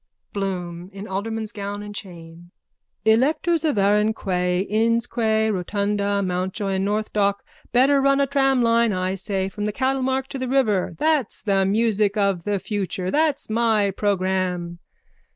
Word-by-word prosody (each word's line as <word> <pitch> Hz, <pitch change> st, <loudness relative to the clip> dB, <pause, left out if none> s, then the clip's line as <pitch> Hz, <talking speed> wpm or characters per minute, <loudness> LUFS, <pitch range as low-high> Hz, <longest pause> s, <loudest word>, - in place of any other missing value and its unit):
BLOOM: 180 Hz, -3 st, -4 dB
(In 200 Hz, +2 st, -8 dB
alderman's 215 Hz, +3 st, -3 dB
gown 205 Hz, -1 st, -5 dB
and 205 Hz, 0 st, -8 dB
chain.) 175 Hz, -4 st, -9 dB, 0.6 s
Electors 300 Hz, +9 st, +2 dB
of 300 Hz, -8 st, +1 dB
Arran 210 Hz, +2 st, +3 dB
Quay, 180 Hz, -2 st, 0 dB
Inns 225 Hz, +3 st, +1 dB
Quay, 220 Hz, -2 st, +1 dB
Rotunda, 200 Hz, +1 st, -1 dB
Mountjoy 185 Hz, +2 st, -2 dB
and 190 Hz, 0 st, 0 dB
North 210 Hz, +1 st, -2 dB
Dock, 200 Hz, -1 st, +1 dB, 0.3 s
better 270 Hz, +3 st, +4 dB
run 275 Hz, 0 st, +3 dB
a 280 Hz, -, +4 dB
tramline, 250 Hz, -5 st, +2 dB
I 185 Hz, +1 st, -1 dB
say, 190 Hz, 0 st, -2 dB
from 205 Hz, +2 st, -5 dB
the 210 Hz, -, 0 dB
cattlemarket 265 Hz, +1 st, -1 dB
to 270 Hz, -, -5 dB
the 255 Hz, -, -2 dB
river. 210 Hz, -10 st, +1 dB
That's 305 Hz, -, 0 dB
the 195 Hz, -2 st, +2 dB
music 210 Hz, 0 st, +1 dB
of 195 Hz, -4 st, +1 dB
the 205 Hz, -1 st, 0 dB
future. 190 Hz, -2 st, -3 dB
That's 305 Hz, -1 st, +1 dB
my 220 Hz, -3 st, +2 dB
programme. 185 Hz, -3 st, -1 dB
205 Hz, 150 wpm, -23 LUFS, 190-230 Hz, 0.6 s, better